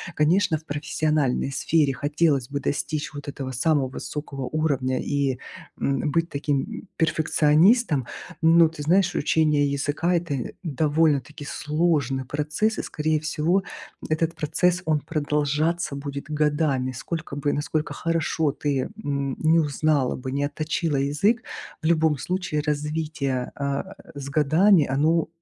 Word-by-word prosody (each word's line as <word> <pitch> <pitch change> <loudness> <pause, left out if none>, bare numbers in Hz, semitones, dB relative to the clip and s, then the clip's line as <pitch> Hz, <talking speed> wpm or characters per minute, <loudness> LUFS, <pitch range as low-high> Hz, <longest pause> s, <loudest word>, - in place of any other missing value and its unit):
Конечно, 165 +3 +3
в 160 - -16
профессиональной 145 -2 0
сфере 145 0 +2
хотелось 145 -1 +1
бы 140 - -2
достичь 150 +2 -2
вот 145 0 -8
этого 135 -2 -5
самого 135 +1 +1
высокого 135 0 -6
уровня 140 -5 0
и, 140 -3 0 0.4
м, 140 +2 0
быть 165 +2 0
таким, 140 -1 0
м, 220 -2 -8
перфекционистом. 160 - +3 0.3
Но 165 0 +6
ты 155 -2 -8
знаешь, 175 +3 +3
учение 150 -4 +2
языка 145 +5 0
это 145 -8 -2
довольно-таки 150 -1 +1
сложный 150 -4 0
процесс 150 - -1
и - - -2
скорее 155 0 0
всего, 160 +5 +1 0.5
этот 160 +1 0
процесс 170 +4 +1
он 155 -2 +1
продолжаться 150 +1 -1
будет 140 0 -5
годами. 145 -4 +1
Сколько 150 +2 -5
бы 145 0 0
насколько 150 +1 -2
хорошо 165 -2 0
ты, 140 -3 -1
м, 140 -2 -2
не 160 +1 +4
узнала 150 -2 +1
бы, 130 0 -6
не 140 +1 0
отточила 155 +1 -2
язык. 175 - +1 0.4
В - - -4
любом 160 -3 +3
случае 180 -1 -2
развитие, 150 -3 -2
а, 140 +7 -3 0.2
с 140 -1 -6
годами 155 +4 +4
оно, 155 +5 +2
150 Hz, 130 wpm, -24 LUFS, 140-160 Hz, 0.5 s, Но